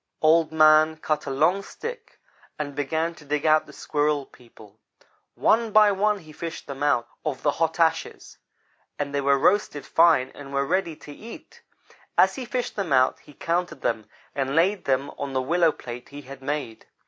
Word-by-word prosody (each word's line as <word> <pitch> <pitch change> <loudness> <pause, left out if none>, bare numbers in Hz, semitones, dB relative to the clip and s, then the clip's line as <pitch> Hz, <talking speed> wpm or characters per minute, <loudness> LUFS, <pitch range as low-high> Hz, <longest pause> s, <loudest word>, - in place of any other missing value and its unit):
Old 160 0 +4
man 155 0 +5
cut 155 -1 -2
a - - -2
long 155 +8 +2
stick 470 - -9 0.4
and 145 -2 -4
began 160 +4 -1
to 160 - -16
dig 150 +1 -2
out 155 0 +4
the - - -12
Squirrel 145 -1 -1
people. 110 -4 -18 0.6
One 225 0 +2
by 210 0 +6
one 205 +2 +1
he 160 -5 -14
fished 165 +1 -7
them 140 -1 -8
out 120 -5 +2 0.2
of 150 -4 -4
the 145 - +3
hot 160 +2 -1
ashes; 165 -1 -1 0.6
and 140 -1 -3
they 140 - 0
were 140 0 +3
roasted 150 -3 +1
fine 160 -6 +4
and 140 -1 -11
were 140 0 0
ready 170 +1 -1
to 150 - -13
eat. 225 +10 -12 0.6
As - - +5
he 260 - -6
fished 245 +1 -3
them 195 -6 -3
out 130 -1 +3
he 150 - -17
counted 170 -4 -2
them, 110 -2 -2 0.2
and 135 0 -2
laid 185 +4 +2
them 135 +1 0
on 140 -1 -4
the 130 - +1
willow 165 +3 +3
plate 120 -3 -9
he 145 +1 -10
had 135 0 -11
made. 135 -5 -4
155 Hz, 185 wpm, -24 LUFS, 140-170 Hz, 0.6 s, by